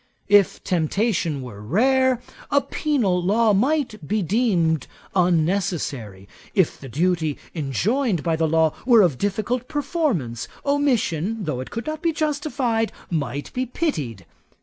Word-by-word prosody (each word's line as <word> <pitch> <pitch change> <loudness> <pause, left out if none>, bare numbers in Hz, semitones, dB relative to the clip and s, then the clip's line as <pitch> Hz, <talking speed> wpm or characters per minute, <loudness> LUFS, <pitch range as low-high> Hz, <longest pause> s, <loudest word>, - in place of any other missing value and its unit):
If 205 -2 +4
temptation 170 - 0
were 105 -5 -9
rare, 255 - +2 0.3
a 285 - +4
penal 245 - 0
law 210 +4 +3
might 235 - 0
be 210 -1 0
deemed 175 - +1 0.3
unnecessary. 170 - 0 0.3
If 190 -6 +2
the 135 - -9
duty 160 +2 0 0.2
enjoined 180 - 0
by 165 -2 +1
the 160 0 +1
law 160 0 +3
were 235 -4 +6
of 155 -9 +1
difficult 220 +5 -1
performance, 280 - -1 0.2
omission, 225 - +1
though 150 -7 -2
it 130 - -6
could 230 - -5
not 310 0 -4
be 335 -2 +1
justified, 285 -7 0 0.2
might 145 -3 -3
be 255 0 -1
pitied. 145 - -3
195 Hz, 130 wpm, -23 LUFS, 155-250 Hz, 0.3 s, were